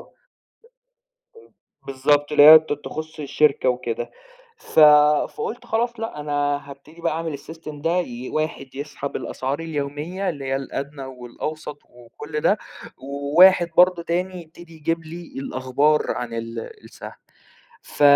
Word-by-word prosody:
امم، - - -17 1.8
بالضبط 145 +2 +1
اللي 150 -1 +6
هي 155 +1 +11
ت 155 -1 -4
تخُصّ 155 0 -7
الشركة 145 -2 +2
وكده، 120 -1 -3 0.5
ف - - -1 0.5
فقُلت 240 - -6
خلاص 235 +1 -1
لأ، 225 -9 -5
أنا 150 0 -5 0.4
هابتدي 150 +4 -15
بقى 165 -2 0
أعمِل 165 0 -3
السِّيستم 155 0 -9
ده 165 +3 +1
ي 125 -8 -4
واحد 155 -4 -4
يسحب 140 0 -6
الأسعار 135 +3 -3
اليوميّة 160 +4 -3
اللي 145 -5 -6
هي 135 0 -1
الأدنى 140 +1 -5
والأوسط 130 +4 -7
وكل 135 +6 -8
ده، 205 - +3 0.4
وواحد 150 +7 +4
برضه 180 -1 +5
تاني 180 +2 -2
يبتدي 165 +1 -15
يجيب 165 +1 -2
لي 170 +2 -10
الأخبار 135 +3 +1
عن 120 -1 -4
ال 115 0 -5 0.2
السَّهم - - -10 0.7
ف - - -6
150 Hz, 130 wpm, -22 LUFS, 135-165 Hz, 1.8 s, هي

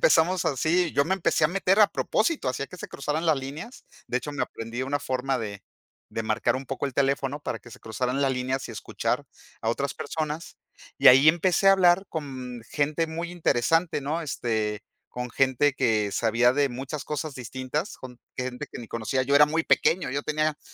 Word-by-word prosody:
empezamos 170 +3 +4
así,y 165 +5 +1
yo 140 - +3
me 190 +4 +1
empecé 165 -4 +1
a 150 - +5
meter 190 +2 +2
a 210 - +9
propósito, 220 - 0
hacía 135 +2 -2
que 180 - -11
se - - -8
cruzaran 150 +5 -2
las 160 - +4
líneas. 155 - -8 0.2
De 125 - 0
hecho, 145 +3 -7
me 135 -3 -2
aprendí 115 +1 -5
una 145 +2 -1
forma 130 0 -1
de 100 -3 -6 0.5
de 115 - -3
marcar 110 +3 +1
un 135 - -7
poco 135 +1 -2
el 135 - -5
teléfono 140 +1 0
para 115 - -4
que 120 - -14
se - - -12
cruzaran 125 +4 -2
las 135 -1 +2
líneas 130 +1 -2
y - - -7
escuchar 110 - -2 0.4
a 110 - 0
otras 140 +4 -1
personas. 155 +2 -4 0.4
Y - - +3
ahí 135 +4 +9
empecé 175 +3 +4
a - - +9
hablar 185 0 +4
con 130 -6 -6
gente 150 +3 0
muy 170 +2 -5
interesante, 165 0 +1
¿no? 150 +4 -2
Este, 110 -8 -2 0.3
con 125 0 -5
gente 135 +3 +2
que 110 -6 +1
sabía 120 +3 +3
de 140 0 +2
muchas 135 +4 -5
cosas 150 -1 -4
distintas, 130 - -4
con 125 -2 -11 0.2
gente 125 0 -4
que - - -9
ni 115 - -10
conocía. 115 +3 -1
Yo 140 +2 +3
era 150 +1 +8
muy 165 +2 0
pequeño. 165 -5 +2
Yo 140 +2 -2
tenía, 155 0 0
140 Hz, 200 wpm, -26 LUFS, 125-160 Hz, 0.5 s, a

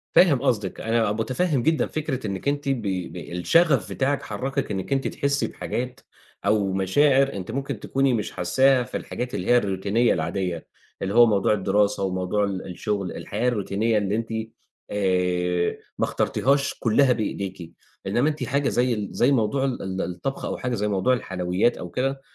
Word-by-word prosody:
فاهم 150 -9 +6
قصدِك. 110 -8 -1
أنا 115 -2 +1
مُتفهِّم 130 +6 0
جدًا 160 +2 +2
فكرة 140 -7 -3
أنِّك 95 +5 -4
أنتِ 145 0 0
ب 130 -4 0 0.3
ب - - -7
الشَغَف 135 - +2
بتاعِك 140 +1 0
حرّكِك 135 +1 -3
إنِّك 95 +7 -2
أنتِ 135 - 0
تحسّي 140 -1 0
بحاجات 125 +1 -4 0.5
أو 100 -2 +2
مشاعر 135 +8 +3
أنتِ 95 +2 -5
ممكن 135 -2 -3
تكوني 135 +3 +1
مش 110 -3 -2
حاسّاها 130 +8 +3
في 120 - -5
الحاجات 125 -1 -5
اللي 95 -2 -3
هي 120 - +6
الروتينية 100 +2 +1
العادية، 85 +1 -2 0.3
اللي 95 +1 -2
هو 120 +1 +8
موضوع 105 -2 +2
الدراسة 100 +1 +1
وموضوع 95 +2 0
ال 95 -2 -2
الشُغل، 95 +1 -3
الحياة 125 - -3
الروتينية 110 -1 0
اللي 100 0 0
أنتِ 115 0 -3 0.6
آآ 90 -3 +1 0.2
ما - - +2
اخترتيهاش 140 +2 +1
كُلّها 125 +3 +4
بإيديكِ، 95 -6 -4 0.4
إنّما 120 +9 +2
أنتِ 150 - -4
حاجة 140 +1 0
زي 125 0 +2
ال 105 -2 -3
زي 130 +4 +2
موضوع 130 +2 +1
ال 95 -7 -3
الطبخ 90 +10 -4
أو - - -3
حاجة 125 -1 -2
زي 105 -1 -1
موضوع 100 +5 +2
الحلويات 95 0 0
أو 90 - -7
كده، 135 +7 -2
110 Hz, 165 wpm, -24 LUFS, 95-135 Hz, 0.6 s, هو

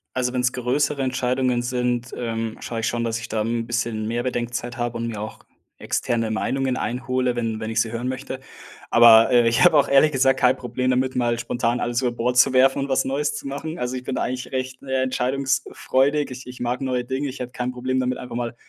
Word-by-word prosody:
Also, 125 -1 0
wenn's 125 0 +1
größere 135 +3 0
Entscheidungen 125 -1 0
sind, 125 -1 -2
ähm, 115 -2 -3
schaue 115 - -4
ich 110 - -1
schon, 120 0 -1
dass 115 0 -1
ich 115 - -8
da 110 - -1
'n 115 +1 -2
bisschen 115 -2 -2
mehr 120 +2 -1
Bedenkzeit 120 0 -3
habe 120 -1 -2
und 115 - -3
mir 110 -3 -5
auch 110 - -7 0.4
externe 115 -2 -1
Meinungen 130 +4 -1
einhole, 125 0 -1
wenn 115 -2 -2
wenn 110 0 -4
ich 115 - 0
sie 115 - +1
hören 120 +2 -3
möchte. 130 0 -5 0.5
Aber, 115 -1 +8
äh, 120 -2 +5
ich 115 - +3
habe 175 -4 +6
auch 145 - +4
ehrlich 140 +2 +5
gesagt 135 -1 +3
kein 125 +1 +4
Problem 125 +1 -2
damit 130 +1 +1
mal 120 -2 +1
spontan 120 0 -1
alles 120 +1 -1
über 125 -2 +1
Bord 125 +1 -1
zu 135 - +6
werfen 135 +2 +4
und 140 0 -2
was 135 - +2
Neues 145 +2 -1
zu 150 - -6
machen. 155 +4 -5
Also, 125 +1 -3
ich 125 - -5
bin 130 - -3
da - - 0
eigentlich 125 0 -4
recht, 130 0 -3
na 135 - -8
ja, 130 0 +2
entscheidungsfreudig. 135 +2 0
Ich 125 0 -8
ich 125 0 -9
mag 125 +1 -2
neue 125 -2 -1
Dinge, 130 +3 -2
ich 130 - -8
hätte 125 -1 -5
kein 125 +1 -2
Problem 130 +1 -2
damit 125 0 -1
einfach 125 -1 -8
mal- 120 -1 -3
125 Hz, 230 wpm, -23 LUFS, 120-130 Hz, 0.5 s, Aber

